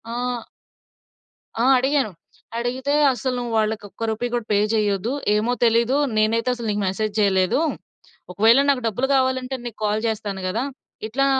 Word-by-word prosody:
ఆహ్ 245 -1 -2 1.2
ఆ! - - +2
అడిగాను. 265 -3 +1 0.5
అడిగితే 255 +4 -1 0.2
అస్సలు 255 +1 -2
నువాళ్ళకొక్క 220 -2 -2
రూపీ 225 +3 -2
గూడా 240 -2 -1
పే 205 - +4 0.2
చేయొద్దు. 210 +1 0 0.2
ఏమో 225 +3 +1
తెలీదు, 235 +3 +3 0.2
నేనైతే 225 +3 +2
అసలు 235 -2 -5
నీకు 205 0 -1
మెసేజ్ 210 +2 -2
చేయలేదు. 190 +3 +2 0.7
ఒకవేళ 225 +7 +5
నాకు 270 -3 +2
డబ్బులు 245 +5 -1
కావాలంటే 260 0 0
నీకు 235 - -7
కాల్ 210 +1 0
జేస్తాను 210 -3 -3
గదా! 220 +7 -1 0.4
ఇట్లా 275 +5 0
230 Hz, 135 wpm, -22 LUFS, 215-250 Hz, 1.2 s, ఒకవేళ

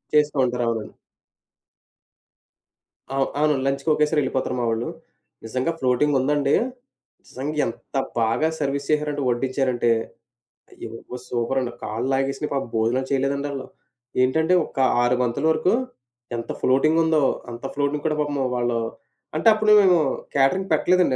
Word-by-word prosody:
చేస్తూ 150 -1 +3
ఉంటారు. 125 0 -1
అవునండి. 110 -2 -4 2.2
ఆవ్ 135 0 +2
అవునండి. 150 -3 +2
లంచ్‌‌‌కొకేసారి 150 +2 +1
ఎళ్ళిపోతారు 130 -1 -1
మావొళ్ళు. 115 0 -1 0.6
నిజంగా 130 +7 -1
ఫ్లోటింగుందండీ 140 +2 +2 0.7
నిజంగా 145 +4 -5
ఎంత 115 +4 -8 0.2
బాగా 115 +7 +2
సర్వీస్ 140 -1 -2
చేసారంటే 150 -1 0
వడ్డించారంటే 130 -1 0 0.8
అయ్యిబాబోయి! 115 +2 -9
సూపరండి. 120 +1 -1
కాళ్ళాగేసినా 135 +6 -1
పాపం 135 -2 -2
భోజనాలు 120 +4 +1
చేయలేదండి 140 +1 0
ఆళ్ళు. 135 -1 -5 0.6
ఏంటంటే 160 +7 +2
ఒక - - -16 0.2
6 120 +1 +3
బంతుల 125 +5 -1
వరకు 160 +5 +2 0.6
ఎంత 115 - -4
ఫ్లోటింగ్ 155 +5 +3
ఉందో. 160 -1 +3 0.3
అంత 120 +2 -9
ఫ్లోటింగ్ 145 +1 -1
కూడా 155 - 0
పాపం 145 -1 -2 0.2
వాళ్ళు 120 -1 0 0.6
అంటే 155 - +1
అప్పుడు 215 0 +2
మేము 185 -2 +5 0.4
క్యాటరింగ్ 140 +8 +2
పెట్టలేదండి 175 -2 +3
135 Hz, 115 wpm, -23 LUFS, 125-150 Hz, 2.2 s, మేము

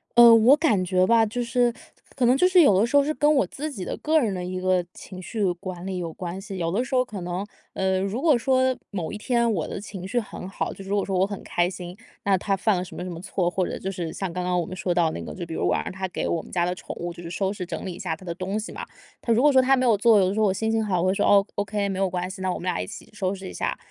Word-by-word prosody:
呃， 235 -1 +9
我 235 +6 +6
感 275 - +2
觉 185 0 +2
吧， 230 +1 +4
就 240 +3 -3
是 240 0 +1 0.4
可 255 - +1
能 245 +2 +5
就 360 +7 +4
是 370 -1 +6
有 210 - +5
的 215 - +4
时 235 - -2
候 285 - +6
是 305 +2 -1
跟 295 0 +3
我 270 - +3
自 305 +3 -5
己 195 -9 -6
的 - - -3
个 315 +1 +2
人 225 -8 0
的 180 -1 -4
一 185 +1 -4
个 185 -1 +2
情 185 -1 -10
绪 210 +3 -2
管 175 0 -7
理 190 -1 -3
有 170 -2 -4
关 175 +2 -6
系。 195 -1 -7
有 165 -2 -1
的 215 +7 +1
时 255 - -8
候 255 0 +3
可 205 -5 -7
能， 180 +3 -3 0.3
呃， 190 -1 0
如 200 +6 -2
果 305 -5 +4
说 260 +1 +2 0.2
某 180 -6 -3
一 - - -4
天 235 +1 +1
我 165 -6 -2
的 - - -5
情 195 -2 -8
绪 240 +5 0
很 200 -4 -7
好， - - -3
就 195 - -10
是 195 - -10
如 200 - +1
果 200 - 0
说 190 -2 -1
我 185 - +4
很 200 -1 -6
开 175 0 0
心， 180 -1 -8 0.3
那 195 -2 +4
他 195 +1 -1
犯 215 +1 +2
了 180 - -1
什 185 - -10
么 - - -5
什 185 - -5
么 170 -1 -7
错， 185 -2 -1
或 185 0 0
者 - - -4
就 190 - -4
是 175 -4 -4
像 190 -3 -4
刚 180 0 -3
刚 180 0 +1
我 170 - -1
们 185 - -7
说 180 -1 -1
到 170 -2 +2
那 - - -5
个， - - -7
就 175 - -5
比 165 - -7
如 - - -1
我 - - +2
让 - - -2
他 190 0 -4
给 - - -3
我 165 - 0
们 - - -15
家 175 -1 +1
的 180 - -1
宠 - - -7
物 175 0 -4
就 170 - -11
是 165 - -6
收 190 +3 -1
拾 185 -3 -5
整 175 - -6
理 185 - -4
一 - - -10
下 170 -4 -2
它 185 - -15
的 170 - -3
东 190 +4 -3
西 215 - -6
嘛， - - -6 0.4
他 235 - -1
如 230 - +4
果 295 +2 +6
说 260 - +7
他 265 +1 +4
没 255 - +1
有 235 -3 +5
做， 215 +1 +5
有 185 - +3
的 190 - -1
时 215 - -2
候 215 - +4
我 - - +2
心 220 +3 -1
情 225 0 +1
好， 190 -4 0
我 185 - +1
会 185 - +3
说 200 - +1
哦 200 -1 +5
，okay， 205 0 -1
没 190 - -3
有 195 - +2
关 180 0 -3
系， 190 0 -8
那 185 0 0
我 - - -4
们 - - -9
俩 180 -2 -1
一 - - -5
起 210 - -10
收 195 -2 -1
拾 190 -1 -8
一 - - -8
下， - - -2
195 Hz, 370 characters per minute, -25 LUFS, 180-230 Hz, 0.4 s, 呃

